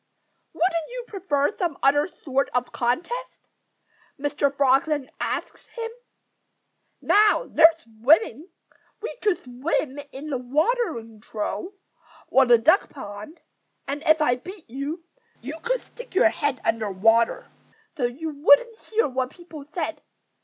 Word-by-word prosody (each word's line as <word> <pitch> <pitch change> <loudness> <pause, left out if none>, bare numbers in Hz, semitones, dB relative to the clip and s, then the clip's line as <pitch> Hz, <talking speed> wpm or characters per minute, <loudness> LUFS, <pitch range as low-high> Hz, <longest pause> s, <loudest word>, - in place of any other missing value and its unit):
"Wouldn't 335 -1 0
you - - -6
prefer 370 - -1
some 345 -7 -2
other 290 +3 +4
sort 275 -6 -2
of 250 0 0
contest?" 355 - -3 0.7
Mr. 290 0 0
Frog 275 -1 +3
then 295 -4 -2
asked - - -4
him. 460 -1 -4 1.1
"Now, 420 +1 +4
there's 325 0 +6
swimming! 275 - +2 0.5
We 450 - -5
could 415 -6 +1
swim 265 +2 -2
in 290 +3 -7
the 260 - -1
watering 255 - -1
trough, 215 - -4 0.6
or 265 -1 +5
the 240 -1 +7
duck 320 - +3
pond. 210 +4 -9 0.5
And 280 +2 -3
if 315 0 +5
I 245 -4 +2
beat 365 +5 -11
you, 280 +7 -5 0.4
you 290 +7 -7
could - - -1
stick 485 -5 -13
your 355 - +6
head 290 -5 -2
under 220 -2 0
water, 225 +4 +2 0.5
so 255 - 0
you 300 +7 -3
wouldn't 295 +11 +4
hear 450 +1 0
what 260 -1 -2
people 325 -3 -12
said. 320 -2 -3
290 Hz, 135 wpm, -24 LUFS, 255-355 Hz, 1.1 s, the